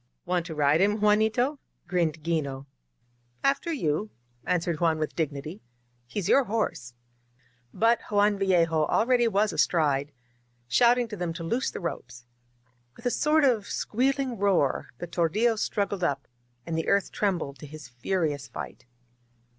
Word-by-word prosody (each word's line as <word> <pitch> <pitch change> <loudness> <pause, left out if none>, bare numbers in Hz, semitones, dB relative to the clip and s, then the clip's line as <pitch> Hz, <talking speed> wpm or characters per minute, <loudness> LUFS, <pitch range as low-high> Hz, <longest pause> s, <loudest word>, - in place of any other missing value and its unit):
"Want 175 -1 -1
to 160 - -6
ride 150 +2 +3
him, 205 +2 +2
Juanito?'* 220 +7 +2 0.3
grinned 165 -4 -1
'Gino. 140 -5 -2 0.8
"After 275 +4 +1
you,'' 205 - -1 0.4
answered 170 -3 0
Juan 165 -2 +2
with 155 -1 -3
dignity. 155 +3 -4 0.5
"He's 180 +8 -3
your 275 - +4
horse. 200 - -2 0.4
•. 125 - -37
." 120 -1 -38
But 230 +1 +3
Juan 205 -1 +3
Vallejo 165 -5 +2
already 240 0 +3
was 210 0 +1
astride, 145 -4 +1 0.6
shouting 240 - +4
to 210 - -5
them 175 -3 -3
to 170 0 -7
loose 235 +10 0
the - - -7
ropes. 120 -8 -6 0.7
With - - -16
a 245 - +2
sort 305 +3 +2
of 235 -7 +2
squealing 260 0 -1
roar, 190 -9 +1
the - - -5
tordiUo 210 +8 +1
struggled 200 -3 -1
up, 140 -4 -1 0.4
and 165 - -3
the 160 - -2
earth 200 0 +2
trembled 170 -9 -2
to 150 - -9
his 150 -2 -10
furious 145 +3 -2
fight. - - -8
180 Hz, 150 wpm, -27 LUFS, 150-220 Hz, 0.8 s, your